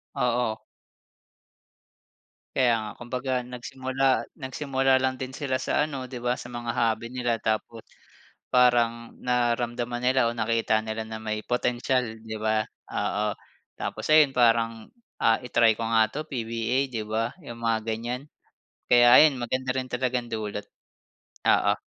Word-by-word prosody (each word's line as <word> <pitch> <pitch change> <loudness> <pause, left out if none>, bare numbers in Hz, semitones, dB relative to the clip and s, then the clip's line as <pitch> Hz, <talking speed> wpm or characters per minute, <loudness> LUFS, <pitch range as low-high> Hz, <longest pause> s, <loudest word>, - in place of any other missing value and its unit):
Oo. 120 -4 0 2.0
Kaya 125 -3 +4
nga, 105 -1 -6
kumbaga 125 +2 -4
nagsimula 130 +2 -5 0.3
nagsimula 135 -1 +1
lang 130 0 0
din 130 +1 -6
sila 130 -2 -1
sa 150 +3 0
ano, 135 -3 -5
di 125 -2 -8
ba? 125 +1 0
Sa 120 - -9
mga 120 0 -5
hobby 115 0 0
nila, 120 -3 -1
tapos 110 +1 -2 0.7
parang 120 -2 +3
nararamdaman 120 0 0
nila 130 -1 +3
o 115 - -1
nakita 115 -1 +1
nila 110 0 -4
na 110 0 -6
may 110 0 -4
potensyal, 125 +1 +1 0.2
di 110 - -5
ba, 110 0 +1 0.2
oo. 105 0 -1 0.4
Tapos - - -4
ayun, 150 -3 +6
parang 115 -2 +2 0.3
ah, 115 0 +4
i-try 115 -2 +3
ko 115 - -2
nga 110 -1 +3
to 155 +2 -5
PBA 120 0 -1
di 115 -3 -3
ba, 110 +2 -1 0.2
yung 115 0 -8
mga 115 -1 0
ganyan. 120 +4 -3 0.6
Kaya 120 0 +7
ayun, 155 -3 +7
maganda 130 +2 -2
rin 130 -1 -3
talagang 125 -1 -1
dulot. 105 -2 -3 0.8
Oo. - - +4
120 Hz, 140 wpm, -26 LUFS, 115-130 Hz, 2.0 s, Kaya